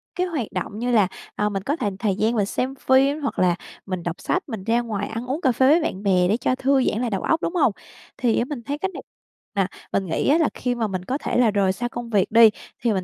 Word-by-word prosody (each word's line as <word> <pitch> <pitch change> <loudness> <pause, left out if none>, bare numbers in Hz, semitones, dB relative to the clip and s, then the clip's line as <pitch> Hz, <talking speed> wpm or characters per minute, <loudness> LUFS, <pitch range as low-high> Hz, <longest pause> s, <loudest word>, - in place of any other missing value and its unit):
cái 365 +1 0
hoạt 295 - -2
động 210 - -4
như 245 +1 -1
là, 215 -5 +4 0.3
ờ, 210 - +1
mình 195 -2 -3
có 285 +7 0
th - - -5 0.2
thời 200 -3 0
gian 220 +4 +1
mình 210 -3 +2
xem 255 +6 -2
phim 275 +3 +3
hoặc 275 - -2
là 180 -2 +3 0.3
mình 185 -3 -4
đọc 170 0 -4
sách, 370 - 0
mình 220 -6 -5
ra 230 +3 +2
ngoài 210 -4 -3
ăn 225 +2 -5
uống, 280 +6 -2
cà 265 - +3
phê 260 +2 +3
với 325 +4 +5
bạn 205 - -3
bè 185 -3 +3
để 210 +5 +2
cho 250 +1 0
thư 265 0 +2
giãn 220 - 0
lại 245 - 0
đầu 195 -3 -2
óc, 325 0 +1
đúng 345 - -2
hông? 295 -9 +4 0.5
Thì 240 -3 +2
á, 235 - +1
mình 265 -3 -6
thấy 285 +4 -3
cách 380 +5 -2
này - - -8 0.5
mà, 195 -2 +2 0.3
mình 195 - +1
nghĩ 165 - -1
á, 295 - +5
là 320 -3 +2
khi 245 -1 -2
mà 230 -2 -1
mình 185 -2 -4
có 260 +7 -1
thể - - -2
là 240 -3 +4
rời 195 -2 +2
xa 240 +5 -3
công 240 -1 -6
việc 205 -4 +1
đi, 230 0 +8 0.3
thì 235 -3 +2
mình 190 -2 -1
235 Hz, 285 wpm, -23 LUFS, 200-270 Hz, 0.5 s, đi